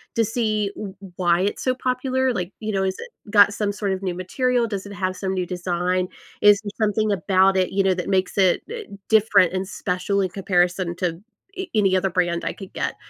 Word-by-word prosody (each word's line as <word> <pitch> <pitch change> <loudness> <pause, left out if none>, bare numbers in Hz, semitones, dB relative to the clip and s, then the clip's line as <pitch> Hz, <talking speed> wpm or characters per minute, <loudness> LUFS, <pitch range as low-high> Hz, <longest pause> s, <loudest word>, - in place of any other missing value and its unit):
to 230 - +3
see 215 -2 -1
w 200 -3 -6
w 190 -3 -12
why 175 -1 +2
it's 200 +2 -1
so 255 - +2
popular, 255 +1 0
like, 180 -3 -3
you 215 -1 -3
know, 195 -1 +1
has 190 0 -1
it - - -8 0.2
got 205 -1 +6
some 205 -1 0
sort 200 -1 -2
of 190 - -4
new 185 - -1
material? 240 +6 0
Does 200 -3 -4
it 200 - -9
have 185 -2 -2
some 190 0 -3
new 180 -1 -1
design? 180 0 -1 0.3
Is 205 -1 +7
there 205 - -5 0.2
something 215 +1 0
about 190 0 +3
it, 185 -1 +1
you 195 0 +1
know, 190 -1 +3
that 180 - -4
makes 190 +1 0
it, 185 -2 +4
eh, 465 -1 -5 0.3
different 200 -5 +4
and 190 0 -2
special 200 +1 -1
in 190 - 0
comparison 180 -1 0
to 180 - +1 0.5
a 375 0 -4
any 195 -3 +3
other 190 +1 0
brand 175 -2 0
I - - -1
could 195 -2 -11
get, - - -2
195 Hz, 225 wpm, -23 LUFS, 185-210 Hz, 0.5 s, Is